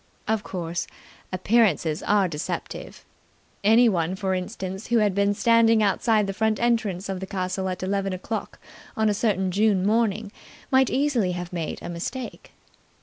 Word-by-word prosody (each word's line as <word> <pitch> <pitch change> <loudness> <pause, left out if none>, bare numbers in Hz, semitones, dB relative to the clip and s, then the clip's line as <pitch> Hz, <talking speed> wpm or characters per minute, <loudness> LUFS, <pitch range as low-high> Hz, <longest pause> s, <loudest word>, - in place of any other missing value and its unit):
Of 220 -1 +1
course, 175 -4 -4 0.4
appearances 185 -5 +2
are 205 -2 +2
deceptive. 150 -3 -6 0.6
Anyone, 205 -6 +4
for 190 -1 -1
instance, 190 +1 -5
who 240 - +2
had 210 -3 +3
been 200 +1 +2
standing 230 0 +4
outside 210 +1 +2
the 195 - -3
front 220 +1 0
entrance 220 -6 0
of 190 -1 -3
the 190 - -6
castle 185 0 -2
at 185 0 -4
eleven 195 0 -1
o'clock 185 +4 -5 0.4
on 220 -1 +3
a - - +2
certain 195 -3 0
June 200 -1 +2
morning 215 -1 +1 0.4
might 265 -1 +4
easily 255 -10 +1
have 175 0 -6
made 165 -3 -3
a - - -5
mistake. 230 +9 -6
200 Hz, 150 wpm, -25 LUFS, 185-220 Hz, 0.6 s, Anyone